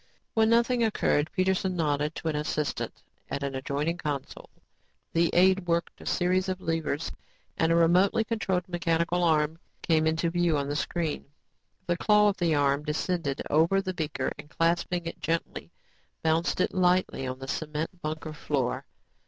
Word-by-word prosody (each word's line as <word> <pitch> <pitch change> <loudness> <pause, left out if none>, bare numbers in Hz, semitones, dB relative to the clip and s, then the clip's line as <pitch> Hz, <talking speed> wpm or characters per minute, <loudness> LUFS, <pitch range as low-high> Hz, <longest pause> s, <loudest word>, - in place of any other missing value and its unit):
When 220 -1 +3
nothing 235 +1 +3
occurred, 155 -8 +1
Peterson 185 0 0
nodded 150 -2 0
to - - -5
an 155 - 0
assistant 150 0 -3 0.3
at 140 - -3
an 140 -1 -2
adjoining 145 +6 -2
console. 145 -3 -5 0.6
The 170 0 +3
aide 185 +1 +4
worked 170 0 -1
a - - -9
series 185 +1 +1
of 185 0 -2
levers 165 -2 -2 0.4
and 165 0 +2
a - - +4
remotely 180 +6 +4
controlled 195 -5 -1
mechanical 170 0 0
arm 160 -1 +2 0.2
came 160 -1 +3
into 160 +1 +1
view 175 -3 +2
on 140 -1 -1
the 145 - -2
screen. 160 0 -2 0.6
The 175 -1 0
claw 210 +2 +4
of 200 - -2
the 170 -5 +2
arm 140 0 +2
descended 150 -1 -2
over 165 +6 +3
the 190 -1 -3
beaker 150 -6 -2
and 150 - -10
clasping 170 +2 0
it 165 - -6
gently, 165 0 -2 0.5
bounced 160 +3 +1
it - - 0
lightly 180 -6 +2
on 130 0 -4
the 135 0 -8
cement 155 +5 -4
bunker 155 0 -4
floor. 140 -4 -2
165 Hz, 160 wpm, -28 LUFS, 150-180 Hz, 0.6 s, aide